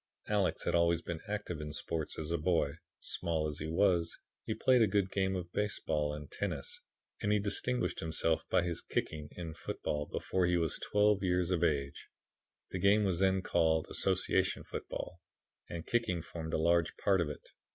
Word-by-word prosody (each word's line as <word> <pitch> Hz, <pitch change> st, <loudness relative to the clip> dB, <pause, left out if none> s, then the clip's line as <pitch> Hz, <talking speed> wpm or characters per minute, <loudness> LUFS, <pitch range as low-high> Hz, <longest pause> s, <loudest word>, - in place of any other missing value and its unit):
Alex 100 Hz, -3 st, +1 dB
had -, -, 0 dB
always 85 Hz, -1 st, +3 dB
been 85 Hz, -2 st, -4 dB
active 105 Hz, -6 st, -3 dB
in 75 Hz, 0 st, -5 dB
sport 80 Hz, +1 st, -3 dB
as 80 Hz, +1 st, -3 dB
a 85 Hz, -, +2 dB
boy. 80 Hz, -3 st, +2 dB, 0.3 s
Small 80 Hz, -2 st, -1 dB
as 75 Hz, 0 st, -5 dB
he 80 Hz, -, -3 dB
was, 85 Hz, -1 st, +2 dB, 0.3 s
he -, -, -1 dB
played 130 Hz, -2 st, +4 dB
a 110 Hz, -, +6 dB
good 100 Hz, -1 st, +1 dB
game 95 Hz, -1 st, +1 dB
of 85 Hz, -2 st, -4 dB
baseball 75 Hz, -8 st, 0 dB
and 75 Hz, -1 st, -7 dB
tennis -, -, -3 dB, 0.4 s
and 105 Hz, -, +1 dB
he 105 Hz, -, +5 dB
distinguished 115 Hz, +4 st, 0 dB
himself 80 Hz, 0 st, +1 dB
by -, -, +3 dB
his 85 Hz, -2 st, -2 dB
kicking 75 Hz, -1 st, -3 dB
in 85 Hz, -3 st, -5 dB
football 75 Hz, -1 st, -3 dB
before 90 Hz, -1 st, 0 dB
he 90 Hz, 0 st, +3 dB
was 80 Hz, -2 st, +1 dB
twelve 105 Hz, -1 st, +3 dB
years 90 Hz, -1 st, +1 dB
of 85 Hz, -2 st, +1 dB
age. 70 Hz, -4 st, 0 dB, 0.6 s
The 95 Hz, -, -3 dB
game 100 Hz, +3 st, +5 dB
was 95 Hz, -4 st, +1 dB
then 95 Hz, -1 st, +3 dB
called 80 Hz, -3 st, +2 dB
Association -, -, +1 dB
Football, -, -, -6 dB, 0.5 s
and 85 Hz, -1 st, -5 dB
kicking 95 Hz, -9 st, 0 dB
formed 80 Hz, -2 st, -4 dB
a -, -, +3 dB
large 85 Hz, +1 st, +2 dB
part 95 Hz, -3 st, +3 dB
of 80 Hz, -, -1 dB
it. 75 Hz, -, -9 dB
85 Hz, 185 wpm, -33 LUFS, 80-95 Hz, 0.6 s, a